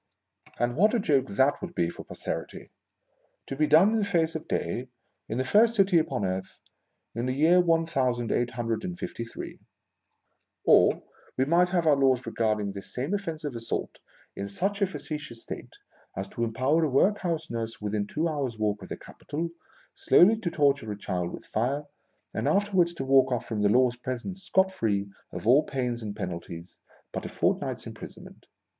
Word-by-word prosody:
And 120 0 0
what 210 - +4
a - - +2
joke 140 -9 +2
that 130 +8 +2
would 180 -2 -7
be 85 - +2
for 85 - -7
Posterity! - - -6 0.7
To 135 - -5
be 155 +2 +2
done 160 +8 +6
in 225 - +2
the - - +1
face 170 -5 +1
of 160 - -6
day, 120 +9 -2 0.4
in 110 - -2
the 130 - 0
first 225 - +4
city 195 -4 +5
upon 155 -10 -1
earth, 95 0 -4 0.5
in. 120 +2 -2
the 130 - 0
year 165 +5 +5
one 165 -1 +2
thousand 125 -7 0
eight 120 0 +1
hundred 115 +2 -1
and 180 -1 -4
fifty 120 - -5
three! 115 - -8 1.1
Or, - - +5 0.3
we 130 - +3
might 175 +4 +3
have 175 -2 +1
our 155 -2 +6
laws 130 -2 +2
regarding 105 -3 0
this 100 0 -8
same 135 +9 -2
offence 165 -6 -3
of 145 -4 -4
assault 115 0 -4 0.4
in 100 0 -4
such 200 - -1
a 200 - +4
facetious 150 -10 -6
state - - -8 0.4
as 95 +1 -3
to 115 - -3
empower 130 +8 +1
a 155 - +2
workhouse 165 - +1
nurse 115 -1 -4
within 105 -1 -2
two 155 +9 -1
hours' 140 -7 -2
walk 105 -1 -1
of - - -10
the - - -5
capital, 165 +3 -6 0.4
slowly 205 +6 +5
to 195 -6 -2
torture 140 -8 +1
a 105 - -5
child 90 -3 -3
with - - -9
fire, 130 +7 -1 0.5
and - - -1
afterwards 190 -4 +2
to 135 - -4
walk 135 -1 +5
off 125 - -1
from 110 -2 -3
the 105 - +4
law's 125 +2 +3
presence 130 +10 -5
scot 190 0 +3
free 100 - -1 0.2
of - - -7
all 130 +6 +6
pains 125 -5 -3
and 105 -2 -5
penalties, 85 0 -7 0.3
but - - -4
a - - -5
fort - - +1
night's - - -4
imprisonment - - -11
135 Hz, 190 wpm, -27 LUFS, 115-170 Hz, 1.1 s, done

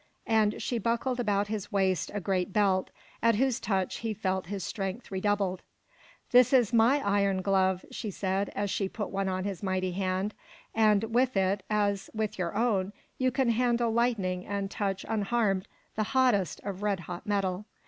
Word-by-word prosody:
And 215 -2 +2
she 240 - -1
buckled 235 +3 0
about 205 -3 +1
his 205 0 -5
waist 190 -3 +1
a - - 0
great 185 0 -1
belt, 190 -2 +2 0.3
at 230 -1 +4
whose 260 +2 +1
touch 190 -3 -1
he 225 -2 -3
felt 190 -3 -2
his 195 -1 -4
strength 195 +3 -4
redoubled. 195 -1 0 0.7
"This 250 +1 +6
is 245 -4 +4
my 235 +5 +5
iron 200 -2 +2
glove," 190 -1 +2
she 215 - -4
said, 195 +1 -1
as 200 -1 -1
she 195 -2 -1
put 210 0 -5
one 195 0 -1
on 185 0 -2
his 195 -2 -4
mighty 185 -2 -1
hand, 190 +2 -1 0.4
"and 215 -2 +4
with 250 -2 +2
it, 190 +1 +2
as 205 -2 0
with 215 -3 -2
your 175 +1 -2
own, 205 -4 +1 0.3
you 255 0 +3
can 260 -1 +1
handle 235 0 +2
lightning 215 -6 0
and 200 0 -3
touch 195 -2 -2
unharmed 210 -2 0 0.3
the 215 - 0 0.2
hottest 210 - +2
of 195 -1 -5
red 205 -3 0
hot 175 +2 -8
metal. 200 -1 0
200 Hz, 175 wpm, -29 LUFS, 190-225 Hz, 0.7 s, This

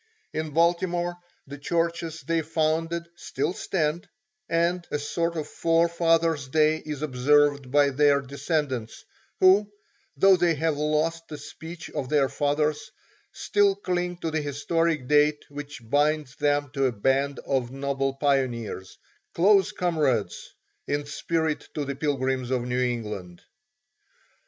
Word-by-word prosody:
In 155 0 -2
Baltimore 175 +2 +1 0.3
the 140 +1 -9
churches 165 +1 -2
they 165 +4 0
founded 165 +2 -1
still 175 - -3
stand, 165 -3 -2 0.4
and 170 +1 +1
a - - -1
sort 170 +3 -2
of 155 - -3
Forefathers' 165 -2 +2
Day 155 +3 +3
is 150 -2 -6
observed 145 0 +2
by 145 +1 +4
their 145 +1 +4
descendants, 140 -3 -3 0.3
who, 200 +2 +5 0.5
though 195 -1 +6
they 175 -2 +2
have 160 +1 0
lost 155 +3 -1
the 150 - -7
speech 160 +3 -9
of 130 - -4
their 145 -3 +3
fathers, 150 +7 -1 0.4
still 200 -1 +2
cling 180 -2 -2
to 165 - -2
the 155 0 0
historic 150 0 -1
date 150 +1 +3
which 145 -4 -9
binds 145 0 +1
them 145 -1 0
to 135 -2 +1
a - - 0
band 135 +5 0
of 130 -3 0
noble 135 0 -2
pioneers 130 -9 -1 0.4
close 195 +3 +4
comrades 145 - -1 0.4
in 145 0 -1
spirit 160 +1 -2
to 150 - -2
the 140 0 -4
Pilgrims 130 -3 -1
of 130 -2 0
New 125 +1 -1
England. 105 -8 -4
150 Hz, 130 wpm, -26 LUFS, 140-165 Hz, 0.5 s, though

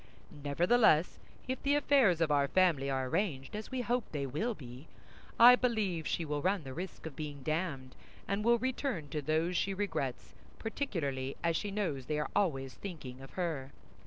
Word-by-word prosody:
Nevertheless, 160 +5 +3 0.3
if 260 0 -3
the 285 +1 +2
affairs 265 - +4
of 160 -2 +2
our 140 -1 +3
family 160 -5 +3
are 130 -1 -1
arranged, 155 -3 -1
as 215 0 -5
we 260 -1 -2
hope 245 0 0
they 145 -2 -2
will 160 - -2
be, 130 0 -11 0.5
I 245 +2 +10
believe 215 - 0
she 165 - -1
will 145 -1 -2
run 185 0 +1
the 135 -1 -7
risk 180 +4 -7
of 160 -4 -6
being 145 -2 -6
damned, 155 -5 -2 0.3
and 200 +1 -1
will 235 +1 +5
return 245 - -2
to 150 +1 -2
those 160 +4 0
she 195 +2 0
regrets, 185 -10 -3 0.2
particularly 145 - -3
as 165 -1 +2
she 205 - -2
knows 170 -11 -2
they 150 - -1
are 150 -2 -2
always 135 -10 0
thinking 140 -10 -8
of 135 - -12
her. 155 -7 -3
165 Hz, 180 wpm, -32 LUFS, 140-205 Hz, 0.5 s, I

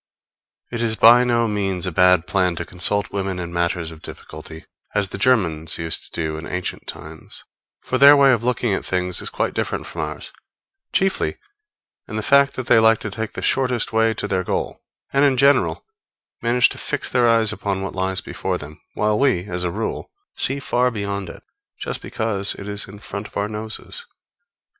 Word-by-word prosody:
It 120 -1 -3
is 115 -2 +2
by 120 +3 +7
no 120 -1 +2
means 95 -4 -1
a 90 - -2
bad 90 0 +4
plan 90 0 +1
to 85 - -4
consult 95 +4 0
women 95 -2 -2
in 85 -1 -5
matters 85 -1 -1
of 80 -1 -12
difficulty, 80 +1 -10 0.3
as 100 -2 +1
the 95 - -6
Germans 85 -10 +2
used 80 -1 -2
to - - -4
do 80 -1 -2
in 80 - -8
ancient 90 0 -4
times; - - -9 0.4
for 130 - -2
their 140 +1 +9
way 140 -1 +6
of 115 -2 0
looking 120 -3 0
at - - -1
things 90 -1 -1
is - - -3
quite - - -2
different - - -2
from 85 - -6
ours, 75 -1 -5 0.6
chiefly 195 0 0 0.7
in - - -7
the 110 - -2
fact 140 +2 +4
that 130 - -4
they 115 - +5
like 110 0 +5
to 105 - -4
take 110 +2 -4
the - - -6
shortest 125 -4 0
way 110 0 +3
to - - -3
their 95 -2 0
goal, - - -3 0.3
and, 140 +1 +4
in 135 -2 +3
general, 140 +2 +3 0.6
manage 120 +1 +3
to - - -7
fix - - -1
their 120 -1 +4
eyes 115 -2 +3
upon 100 -2 -2
what 95 - -4
lies 95 0 0
before - - -3
them; 75 +1 -11
while 105 0 +1
we, 130 -11 +2
as 90 -2 -4
a 90 - 0
rule, 110 +6 -4 0.3
see 135 +2 0
far 125 -2 +1
beyond 100 -4 -4
it, - - -11 0.4
just - - -4
because 105 -3 -2
it 100 - -9
is 105 0 -4
in 100 +2 -11
front 100 0 -7
of - - -9
our 100 0 0
noses. 110 - -6
105 Hz, 200 wpm, -21 LUFS, 90-120 Hz, 0.7 s, their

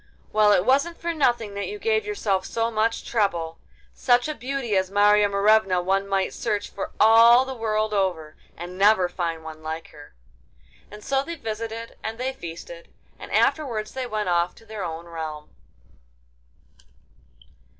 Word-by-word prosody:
Well, 215 -1 +5
it 190 -2 +3
wasn't 280 +6 +2
for 340 0 -3
nothing 240 -8 +1
that 200 0 -4
you 420 - -6
gave 435 0 0
yourself 205 - -1
so 230 0 -1
much 225 +1 0
trouble. 175 -8 -1 0.3
Such 245 0 +2
a 305 - -2
beauty 255 -4 -3
as 190 -1 +1
Marya 205 +1 +4
Morevna 200 -2 +3
one 195 +2 0
might 195 -1 0
search 205 -1 -3
for 200 - -5
all 230 +3 +7
the 265 - -5
world 215 -2 -1
over—and 180 -1 -4
never 200 -2 +5
find 170 -2 -4
one 160 -1 -9
like 160 +1 -6
her!' 145 - -15 0.7
And 210 0 -12
so 270 0 +1
they 335 +4 -6
visited, 225 -3 -6
and 220 +1 -4
they 260 +2 -2
feasted; 265 - -10 0.3
and - - -10
afterwards 235 -9 +1
they 260 -1 -4
went 210 -4 -2
off 175 0 +1
to 225 - -18
their 215 -2 -6
own 165 -1 -5
realm. 160 -3 -7
215 Hz, 160 wpm, -24 LUFS, 185-240 Hz, 0.7 s, all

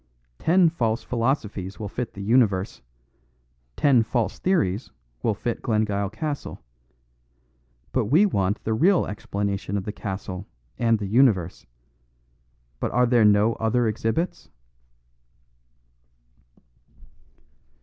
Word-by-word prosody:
Ten 175 0 +4
false 115 -8 -1
philosophies 115 -6 -2
will 105 - -4
fit 120 +3 -5
the 100 - -6
universe; 105 -4 +2 0.9
ten 135 - +4
false 115 0 -1
theories 125 - 0 0.3
will 110 - 0
fit 120 +2 -3
Glengyle 105 -4 0
Castle. 145 +6 -5 1.3
But 130 -3 +1
we 155 - +4
want 100 - 0
the 110 - -1
real 175 - +3
explanation 100 -1 -3
of 95 - -3
the 105 - -3
castle 95 -2 -6 0.3
and 115 -1 +3
the 105 - -5
universe. 100 -5 +2 1.1
But - - -2
are 125 0 +4
there 120 -2 +4
no 105 +2 +4
other 115 +1 +1
exhibits?" 115 - -2
110 Hz, 110 wpm, -24 LUFS, 100-125 Hz, 1.3 s, Ten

